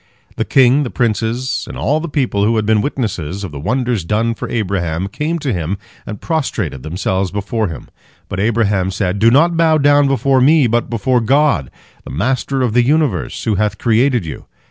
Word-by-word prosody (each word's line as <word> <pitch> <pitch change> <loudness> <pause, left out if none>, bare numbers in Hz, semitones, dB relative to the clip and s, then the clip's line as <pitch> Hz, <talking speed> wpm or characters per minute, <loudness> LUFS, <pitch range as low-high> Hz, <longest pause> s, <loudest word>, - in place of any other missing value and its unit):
The - - -2
king, 135 +1 +4
the 135 - -2
princes, 115 +3 -1
and - - -7
all 150 +3 0
the 170 +1 -5
people, 125 -9 0
who 115 +3 +2
had 110 -1 0
been 110 0 +3
witnesses 100 - -3
of 95 - -5
the 70 - -7
wonders 120 - -1
done 110 +6 0
for - - -6
Abraham, 95 -5 -2
came 150 +11 -2
to 145 -6 -2
him, 90 +2 -2 0.3
and 105 -2 -6
prostrated 115 - -2
themselves 95 +5 -2
before 105 +3 -2
him. 80 -7 -8 0.4
But 95 - -5
Abraham 105 -3 +1
said: 95 0 -2
"Do 115 +2 +5
not 165 +8 +4
bow 160 -1 +3
down 145 -1 +4
before 135 -1 +2
me, 150 +2 +5
but 120 0 0
before 120 +2 +1
God, 115 - +2 0.3
the - - -10
Master 130 - -1
of 120 -4 0
the 120 - +4
universe, 150 +3 0
who 110 - 0
hath 105 0 -1
created 120 -1 +2
you. 80 - -8
115 Hz, 190 wpm, -16 LUFS, 100-135 Hz, 0.4 s, Do